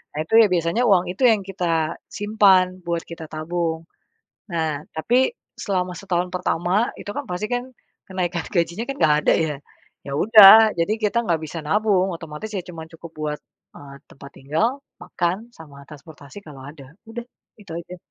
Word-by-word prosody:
Nah, 150 Hz, -, -3 dB
itu 165 Hz, -, -10 dB
ya 220 Hz, -, +5 dB
biasanya 170 Hz, +7 st, +1 dB
uang 180 Hz, -3 st, +3 dB
itu 250 Hz, +7 st, +2 dB
yang 215 Hz, -4 st, +3 dB
kita 170 Hz, -4 st, -2 dB
simpan 195 Hz, -3 st, +2 dB
buat 170 Hz, -1 st, -2 dB
kita 165 Hz, -1 st, -9 dB
tabung. 160 Hz, +1 st, -3 dB, 0.7 s
Nah, 160 Hz, -4 st, -2 dB
tapi 245 Hz, +11 st, +2 dB, 0.2 s
selama 180 Hz, -2 st, -2 dB
setahun 180 Hz, -2 st, -2 dB
pertama 180 Hz, +5 st, 0 dB
itu 205 Hz, -, -7 dB
kan -, -, -3 dB
pasti 180 Hz, +4 st, -3 dB
kan 245 Hz, 0 st, -1 dB, 0.4 s
kenaikan 180 Hz, -2 st, -2 dB
gajinya 170 Hz, +2 st, -1 dB
kan 275 Hz, -, -5 dB
ga 150 Hz, -, +4 dB
ada -, -, +3 dB
ya. 155 Hz, -3 st, -1 dB, 0.5 s
Ya 140 Hz, -, -6 dB
udah, 215 Hz, +4 st, +8 dB
jadi 170 Hz, +5 st, +1 dB
kita 230 Hz, +3 st, +1 dB
ga 170 Hz, -2 st, +2 dB
bisa 160 Hz, +1 st, -6 dB
nabung 195 Hz, +2 st, +1 dB
otomatis 165 Hz, +5 st, -8 dB
ya 195 Hz, -, -2 dB
cuma 165 Hz, -3 st, -8 dB
cukup 165 Hz, 0 st, -12 dB
buat, 150 Hz, -1 st, -4 dB, 0.4 s
eee, 140 Hz, -1 st, -12 dB, 0.2 s
tempat 140 Hz, 0 st, -13 dB
tinggal, 220 Hz, -, -1 dB, 0.2 s
makan, 185 Hz, +7 st, -3 dB
sama 145 Hz, -3 st, -13 dB
transportasi 150 Hz, +2 st, -13 dB
kalau 140 Hz, -3 st, -11 dB
ada. 140 Hz, -1 st, -12 dB, 0.2 s
Udah, 235 Hz, +1 st, -7 dB, 0.3 s
itu 200 Hz, -4 st, -16 dB
aja. 170 Hz, +2 st, -7 dB
175 Hz, 165 wpm, -22 LUFS, 160-205 Hz, 0.7 s, udah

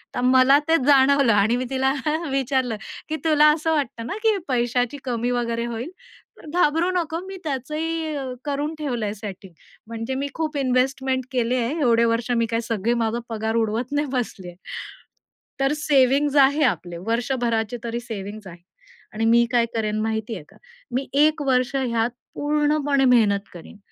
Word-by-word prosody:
तर 245 Hz, -, -1 dB
मला 260 Hz, +2 st, +6 dB
ते 325 Hz, 0 st, +4 dB
जाणवलं 275 Hz, -3 st, +5 dB
आणि 205 Hz, +4 st, +3 dB
मी 255 Hz, -, -2 dB
तिला 265 Hz, 0 st, +1 dB, 0.4 s
विचारलं 260 Hz, -3 st, 0 dB, 0.3 s
की 315 Hz, -, -1 dB
"तुला 305 Hz, -1 st, +5 dB
असं 320 Hz, +1 st, -1 dB
वाटतं 240 Hz, -6 st, -2 dB
ना -, -, -3 dB
की 435 Hz, -2 st, +3 dB
पैशाची 245 Hz, +2 st, 0 dB
कमी 240 Hz, 0 st, -1 dB
वगैरे 235 Hz, -1 st, -1 dB
होईल? 235 Hz, +5 st, -4 dB, 0.5 s
तर -, -, -15 dB
घाबरू 325 Hz, +2 st, +3 dB
नको 335 Hz, -2 st, -1 dB
मी 385 Hz, 0 st, -7 dB
त्याचही 310 Hz, +3 st, -3 dB, 0.3 s
करून 290 Hz, +2 st, -2 dB
ठेवलंय 235 Hz, -8 st, -2 dB
सेटिंग. 195 Hz, -2 st, -9 dB, 0.4 s
म्हणजे 230 Hz, +3 st, -4 dB
मी 280 Hz, +1 st, -2 dB
खूप 310 Hz, -2 st, -2 dB
इन्व्हेस्टमेंट 260 Hz, 0 st, 0 dB
केली 245 Hz, 0 st, 0 dB
आहे. 250 Hz, +7 st, -1 dB
एवढे 235 Hz, -2 st, +4 dB
वर्ष 230 Hz, +1 st, 0 dB
मी 230 Hz, -, +2 dB
काय 230 Hz, +1 st, -1 dB
सगळे 225 Hz, +1 st, 0 dB
माझा 225 Hz, +2 st, -1 dB
पगार 220 Hz, 0 st, -2 dB
उडवत 230 Hz, +3 st, -1 dB
नाही 290 Hz, 0 st, 0 dB
बसली 220 Hz, -7 st, -3 dB
आहे. 175 Hz, -, -10 dB, 1.1 s
तर 270 Hz, +2 st, +2 dB
सेव्हिंग्ज 285 Hz, 0 st, +3 dB
आहे 285 Hz, +2 st, +5 dB
आपले. 175 Hz, -, -1 dB
वर्षभराचे 235 Hz, -1 st, -1 dB
तरी 235 Hz, 0 st, -3 dB
सेव्हिंग्ज 210 Hz, -3 st, -7 dB
आहे. 170 Hz, -1 st, -12 dB, 0.5 s
आणि 225 Hz, +1 st, -1 dB
मी 235 Hz, +1 st, +5 dB
काय 235 Hz, -1 st, +3 dB
करेन 215 Hz, -1 st, -1 dB
माहिती 220 Hz, +1 st, -2 dB
आहे 165 Hz, -, -8 dB
का? -, -, -20 dB, 0.3 s
मी 260 Hz, +2 st, -2 dB
1 300 Hz, +2 st, +3 dB
वर्ष 255 Hz, +1 st, +1 dB
ह्यात 235 Hz, -3 st, 0 dB, 0.3 s
पूर्णपणे 290 Hz, -2 st, +1 dB
मेहनत 220 Hz, -5 st, +4 dB
करीन 175 Hz, +4 st, -12 dB
250 Hz, 165 wpm, -23 LUFS, 230-285 Hz, 1.1 s, मला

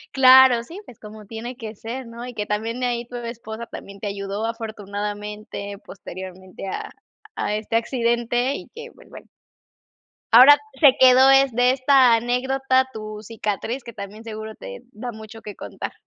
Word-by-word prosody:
Claro, 260 Hz, -2 st, +7 dB
sí, 330 Hz, +11 st, -10 dB
pues, 240 Hz, -, -14 dB
como 215 Hz, 0 st, -12 dB
tiene 230 Hz, +4 st, -7 dB
que 225 Hz, -3 st, -8 dB
ser, 235 Hz, +4 st, -7 dB
¿no? 235 Hz, +1 st, -8 dB
Y 250 Hz, -, -8 dB
que 210 Hz, -2 st, -3 dB
también 225 Hz, +4 st, -3 dB
ahí 240 Hz, -1 st, -1 dB
tu 245 Hz, +1 st, -8 dB
esposa 235 Hz, -1 st, -7 dB
también 200 Hz, -3 st, -10 dB
te 205 Hz, -, -4 dB
ayudó 200 Hz, +1 st, -4 dB
afortunadamente, 210 Hz, -2 st, -6 dB
posteriormente 185 Hz, 0 st, -9 dB
a, -, -, -5 dB, 0.5 s
a 210 Hz, -, -2 dB
este 215 Hz, +1 st, -4 dB
accidente, 240 Hz, +2 st, 0 dB
y -, -, -9 dB
que, 470 Hz, 0 st, -10 dB
pues, -, -, -19 dB
bueno. -, -, -13 dB, 1.1 s
Ahora, 260 Hz, +5 st, +9 dB, 0.2 s
se 275 Hz, -4 st, +7 dB
quedó 260 Hz, +1 st, +7 dB
es 270 Hz, 0 st, +5 dB
de 245 Hz, +2 st, +4 dB
esta 260 Hz, -2 st, +5 dB
anécdota 260 Hz, +2 st, +1 dB
tu 215 Hz, -1 st, -7 dB
cicatriz, 220 Hz, +3 st, -4 dB
que 235 Hz, -, -10 dB
también 210 Hz, +2 st, -9 dB
seguro 220 Hz, -1 st, -7 dB
te, 95 Hz, 0 st, -10 dB
da 240 Hz, +4 st, -6 dB
mucho 220 Hz, 0 st, -11 dB
que 210 Hz, -1 st, -9 dB
contar. -, -, -7 dB
230 Hz, 165 wpm, -22 LUFS, 210-250 Hz, 1.1 s, Ahora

